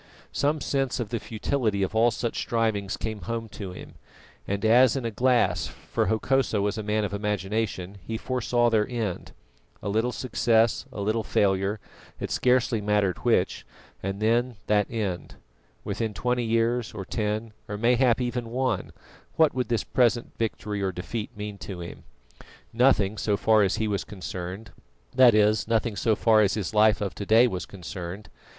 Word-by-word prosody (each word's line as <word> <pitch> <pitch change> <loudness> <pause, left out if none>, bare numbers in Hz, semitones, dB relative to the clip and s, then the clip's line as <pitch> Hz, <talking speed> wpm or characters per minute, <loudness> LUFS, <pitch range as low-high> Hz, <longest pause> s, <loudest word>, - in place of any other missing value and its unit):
Some 145 +1 0
sense 135 -3 -1
of 115 -4 -3
the 115 - -2
futility 105 0 -1
of 95 - -2
all 115 +2 +4
such 120 +1 -3
strivings 110 -4 -1
came 110 -2 -4
home 115 +5 -4
to 100 -2 -7
him, 90 - -10 0.5
and 100 +2 -2
as 125 +3 +6
in 130 -3 -2
a 115 - -1
glass, 125 +2 +2
for - - -3
Hokosa 115 0 +1
was 100 0 0
a - - -1
man 105 0 0
of 100 - -5
imagination, 100 -1 -2
he 110 - -4
foresaw 120 -1 +1
their 110 -2 +2
end. 115 -7 -3 0.5
A 100 - -2
little 110 +4 +1
success, 115 -3 +1
a 100 - -5
little 110 +3 0
failure, 100 +1 +1 0.4
it - - -4
scarcely 125 -3 +2
mattered 105 -3 +1
which, - - +1 0.4
and 95 +1 -3
then 120 +3 +1
that 105 -1 +2
end. 105 -6 -3 0.5
Within 110 -3 -3
twenty 125 -1 0
years, 115 +1 0
or 95 -3 -5
ten, 110 +1 -2 0.2
or 105 - -3
mayhap 120 +2 +3
even 120 -1 -2
one, 130 +2 -1 0.4
what 160 -2 +4
would 125 -1 -1
this 115 -2 +1
present 120 -1 +1
victory 105 -2 -3
or 95 -1 0
defeat 105 +5 -5
mean 105 -1 -6
to 90 0 -7
him? 85 0 -9 0.7
Nothing 110 -4 +3
so 105 -2 +1
far 110 +1 +4
as 95 -2 +2
he 110 - -1
was 100 -2 -1
concerned; 95 +1 -7 0.4
that 125 -3 +6
is, 105 +1 +3
nothing 115 -1 0
so 110 +1 +2
far 110 -1 +4
as 100 -2 +2
his 105 -3 -3
life 105 +1 +4
of 100 -3 -2
to - - -6
day 115 +3 +6
was 95 -7 -3
concerned. 90 +1 -7
110 Hz, 170 wpm, -26 LUFS, 100-120 Hz, 0.7 s, as